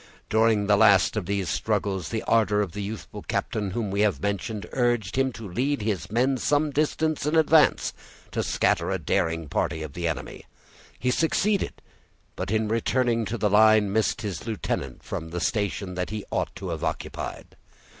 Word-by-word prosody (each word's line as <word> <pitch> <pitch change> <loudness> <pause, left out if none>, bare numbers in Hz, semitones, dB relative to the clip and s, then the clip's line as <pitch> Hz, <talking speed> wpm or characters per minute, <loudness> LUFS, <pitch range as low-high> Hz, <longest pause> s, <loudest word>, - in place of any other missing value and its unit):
During 110 -1 +3
the 105 0 +4
last 100 -2 +5
of 100 -5 -2
these 100 -2 -1
struggles, 100 -5 -1
the 110 -1 -2
ardor 105 -2 +3
of 100 -5 -1
the 105 - -5
youthful 105 +1 -6
captain 105 -2 -2
whom 105 0 -3
we 100 +1 0
have 105 -2 +2
mentioned 100 +1 -3
urged 120 -6 0
him 135 0 +2
to 115 -3 -8
lead 125 +6 -1
his 105 -2 -2
men 130 +4 +2
some 145 +3 +1
distance 155 +1 0
in 155 - +1
advance, 160 -1 +4 0.4
to - - -1
scatter - - +1
a - - 0
daring 80 -4 -1
party 80 +2 -1
of 75 -3 -7
the 85 +1 -2
enemy. 80 - -5 0.5
He 125 - 0
succeeded, 190 +8 0 0.5
but - - -4
in 110 +1 +1
returning 115 +1 +1
to 115 +3 -3
the 110 - +1
line 110 -1 +5
missed 110 +1 +1
his 100 0 -5
lieutenant 110 -3 -3
from 80 - -5
the 90 +2 -4
station 100 -1 -1
that 90 0 -3
he 105 -1 -5
ought - - -2
to - - -6
have - - -4
occupied. - - -5
110 Hz, 180 wpm, -26 LUFS, 100-120 Hz, 0.5 s, last